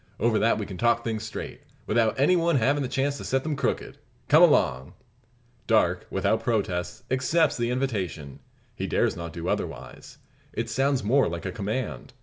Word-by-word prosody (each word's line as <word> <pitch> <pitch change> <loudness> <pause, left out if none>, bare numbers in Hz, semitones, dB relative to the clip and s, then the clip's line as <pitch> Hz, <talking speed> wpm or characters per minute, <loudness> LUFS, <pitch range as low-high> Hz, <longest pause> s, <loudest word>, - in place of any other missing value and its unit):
Over 115 -1 +2
that 115 - +3
we 105 - -3
can 95 -3 -8
talk 120 0 +2
things 110 -2 -2
straight, 110 -1 -7 0.2
without 110 +2 +1
any 150 +7 +4
one 170 -2 +2
havin' 140 +4 +2
the 130 - -2
chance 140 +1 0
to - - -8
set 135 0 0
them 155 -2 -2
crooked. 140 - -2 0.3
Come - - +7
along!" 65 +2 +3 0.7
Darke, - - +2
without 110 0 0
protest, 100 -7 -2
accepts 155 +5 +2
the 120 0 -1
invitation. 100 - -3 0.4
He - - -3
dares - - +1
not 85 -1 -6
do 85 0 -6
otherwise. 65 +1 -5 0.4
It - - -3
sounds 135 -2 +1
more 130 +6 +3
like 85 0 -5
a - - -2
command. 105 - -4
115 Hz, 175 wpm, -26 LUFS, 95-135 Hz, 0.7 s, Come